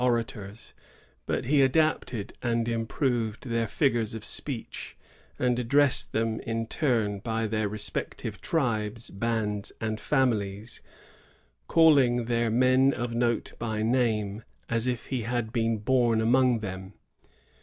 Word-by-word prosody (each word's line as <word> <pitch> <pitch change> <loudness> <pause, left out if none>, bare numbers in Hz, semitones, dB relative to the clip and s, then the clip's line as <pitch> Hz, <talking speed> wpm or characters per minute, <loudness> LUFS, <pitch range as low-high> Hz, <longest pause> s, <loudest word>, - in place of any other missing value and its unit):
67 125 0 +4
orators, 115 -3 -5 0.5
but - - -1
he 140 +2 +4
adopted 130 -6 +1
and 115 -1 0
improved 115 -1 -1
their 115 -1 0
figures 115 -6 0
ol 110 - -6
speech, 120 +2 -3 0.4
and 125 -1 +1
addressed 140 +3 +3
them 110 0 0
in 115 0 -3
turn 110 -7 0
by 115 +1 -2
their 110 -1 -1
respective 105 +1 -4
tribes, 115 -7 -1
bands, 105 -1 -2
and 110 -1 -2
families, 110 -5 0 0.9
calling 140 -8 +5
their 115 -1 +1
men 130 +3 +4
of 120 -1 -3
note 120 0 0
by 110 -2 -2
name, 110 -3 0 0.3
as 115 +1 0
if 125 -2 -2
he 130 -3 -1
had 115 0 -2
been 115 -2 +1
bom 120 0 +2
among 120 +1 +3
them. 95 -1 -6
115 Hz, 130 wpm, -27 LUFS, 110-125 Hz, 0.9 s, calling